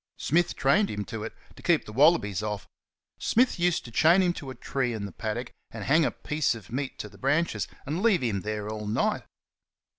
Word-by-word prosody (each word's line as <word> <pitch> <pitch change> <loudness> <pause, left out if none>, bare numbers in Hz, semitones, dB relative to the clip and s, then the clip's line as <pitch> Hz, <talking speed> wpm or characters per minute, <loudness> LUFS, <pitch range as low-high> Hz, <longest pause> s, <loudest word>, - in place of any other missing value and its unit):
Smith 170 +4 +1
trained 190 +10 +3
him 105 -1 -3
to 110 -2 -5
it 115 - -5 0.2
to - - -13
keep 170 -3 +2
the 105 - -9
wallabies 130 - +4
off. 105 -1 -4 0.5
Smith 245 -4 +2
used 175 -1 +1
to 120 - -9
chain 170 +10 +5
him 175 -1 +2
to 140 -5 -7
a 130 - -7
tree 130 -3 -2
in 105 -2 -4
the 100 - -7
paddock 120 +2 -4 0.2
and 110 -2 -7
hang 155 +7 +4
a - - +2
piece 150 -4 -1
of 110 -4 -12
meat 130 +1 -3
to - - -5
the 100 -1 -16
branches, 135 - +1 0.2
and 155 +6 -2
leave 200 - +3
him 105 -5 0
there 105 0 -3
all 105 -1 -5
night. 105 - +1
130 Hz, 215 wpm, -27 LUFS, 105-165 Hz, 0.5 s, chain